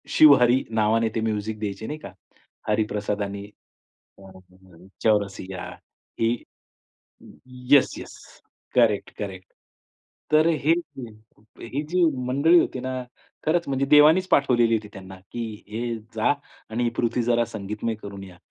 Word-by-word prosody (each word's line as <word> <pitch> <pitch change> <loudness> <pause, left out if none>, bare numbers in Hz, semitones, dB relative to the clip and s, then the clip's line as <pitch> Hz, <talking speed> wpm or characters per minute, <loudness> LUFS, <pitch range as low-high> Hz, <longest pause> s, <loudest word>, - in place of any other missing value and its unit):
शिवहरी 130 -4 +6
नावाने 110 +1 +2
ते 110 - 0
म्युझिक 110 -1 -2
द्यायचे 105 0 -4
नाही 150 +1 -5
का, 100 - -10 0.6
हरिप्रसाद 105 -1 -1
आणि 100 0 -5 0.7
अ, 95 -1 -14 0.7
चौरसिया 100 -3 -1 0.5
ही 115 0 +2 1.4
येस, 145 -2 +6
येस. - - -9 0.6
Correct, 115 -5 +3
correct. 95 -3 -6 0.9
तर 155 +1 +5
हे 160 -1 +2 0.9
ही 135 +6 -4
जी 180 +1 +1 0.2
मंडळी 150 +7 +4
होती 130 - -2
ना 130 0 -4 0.4
खरंच 170 +2 +1
म्हणजे 135 0 0
देवानीच 155 +6 +6
पाठवलेली 120 -5 +3
होती 105 -1 -2
त्यांना 95 0 -10 0.2
की 120 - -4 0.3
हे 115 +2 -3 0.2
जा 110 +5 +2 0.4
आणि 120 +2 -2
ही 120 - +1
पृथ्वी 120 0 0
जरा 120 0 +2
संगीतमय 105 +1 -4
करून 100 -1 -8
या 90 -2 -13
115 Hz, 125 wpm, -24 LUFS, 105-130 Hz, 1.4 s, शिवहरी